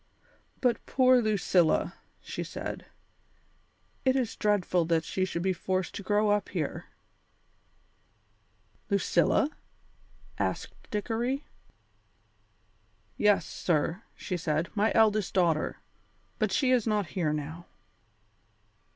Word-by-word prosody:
"But 250 -2 +1
poor 255 -1 +5
Lucilla!" 195 -6 +2 0.3
she - - -5
said. - - -6 1.2
"It 260 -1 +3
is 255 -5 0
dreadful 190 -4 +1
that 165 -1 +1
she 185 +4 -1
should 170 -2 -3
be 190 0 +2
forced 185 +1 -2
to - - -5
grow 205 +1 +2
up 205 0 +1
here." - - -3 2.0
"Lucilla?" 200 - +2 0.9
asked - - -2 0.2
Dickory. 235 +6 -2 1.7
"Yes, 210 -1 +3
sir," 165 +3 -1
she 180 - -4
said, 155 0 -1
"my 215 +1 +2
eldest 215 -3 +3
daughter. 170 -4 +2 0.6
But 215 -4 +1
she 260 +4 +2
is 245 -3 +3
not 210 -6 0
here 165 -5 0
now." 155 +3 -5
200 Hz, 105 wpm, -29 LUFS, 175-220 Hz, 2.0 s, poor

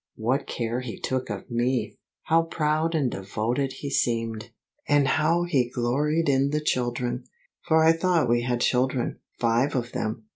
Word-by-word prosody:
What 125 +6 -1
care 115 0 -2
he 125 -3 -6
took 130 -2 -2
of 105 +4 -6
me! 120 -1 -1 0.2
How 165 +1 +3
proud 160 0 0
and 135 -6 +1
devoted 110 +8 -2
he 140 - -4
seemed! 115 -4 -1 0.4
And 145 -1 +4
how 165 +4 +2
he 135 -8 +1
gloried 145 +7 0
in 135 0 +3
the 150 +1 0
children! 125 -3 -1 0.4
For 160 0 +4
I 160 - +7
thought 165 0 +2
we 120 0 +2
had 120 0 -1
children, 125 0 +1 0.2
five 120 +5 +1
of 120 -1 -2
them! 110 0 -3
130 Hz, 160 wpm, -26 LUFS, 120-150 Hz, 0.4 s, I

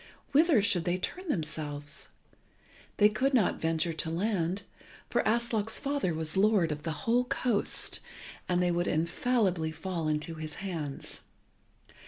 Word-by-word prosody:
Whither 290 - +5
should 180 -4 +2
they 175 +1 +1
turn 365 - -4
themselves? 150 - -3 0.9
They 210 - +7
could 260 +6 +1
not 215 -7 +2
venture 165 +1 0
to 160 0 -1
land, 185 +1 -1 0.5
for - - +3
Aslog's 225 -1 +1
father 280 -10 -1
was 160 -1 -2
lord 195 -4 +3
of 150 0 -4
the 155 -2 -5
whole 245 +2 +3
coast, 245 -4 +2 0.5
and 180 0 +2
they 175 - +2
would 175 0 0
infallibly 175 0 +1
fall 165 0 -3
into 150 +2 -1
his 155 -1 -6
hands. 165 -8 -4
180 Hz, 140 wpm, -30 LUFS, 160-220 Hz, 0.9 s, They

